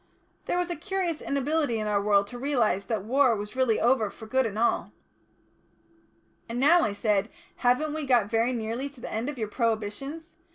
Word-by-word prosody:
There - - -1
was 355 0 -1
a - - -2
curious 350 -1 -2
inability 280 -2 0
in 215 - -2
our 205 -1 +1
world 200 -1 +3
to 245 - -8
realise 240 -8 +1
that 220 -5 -2
war 255 +2 +3
was 210 +2 -6
really 255 -4 +2
over 235 -3 +2
for 220 - -11
good 260 +2 +1
and 210 -1 -6
all." 235 +2 +1 1.6
"And 235 +1 -3
now," 325 +6 +6
I 215 - +1
said, 205 0 0 0.3
"haven't 260 +5 +2
we 310 -2 -3
got 240 -5 +4
very 225 +3 +1
nearly 235 +3 -3
to 280 -2 -16
the - - -7
end 225 +5 -2
of 295 - -6
your 220 -2 -2
prohibitions? 230 - -3
245 Hz, 195 wpm, -27 LUFS, 220-285 Hz, 1.6 s, now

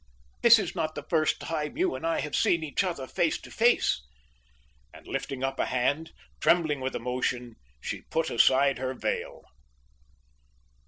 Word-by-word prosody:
This 235 0 +8
is 200 -6 -2
not 155 -3 -2
the 150 - -5
first 155 -2 +1
time 155 - -4
you 360 +1 +1
and - - -3
I 165 - 0
have 150 - -3
seen 170 -2 +2
each 155 +5 0
other 170 -8 -3
face 160 +4 0
to - - -12
face." 235 - +3 0.9
And - - -15
lifting 135 -1 -4
up 135 0 -2
a - - +1
hand, 145 +6 0 0.3
trembling 155 -5 +2
with 130 0 -3
emotion, 125 -1 -2 0.2
she - - -5
put 160 0 0
aside 135 +3 +4
her 130 0 -3
veil. - - -3
150 Hz, 160 wpm, -28 LUFS, 130-165 Hz, 0.9 s, This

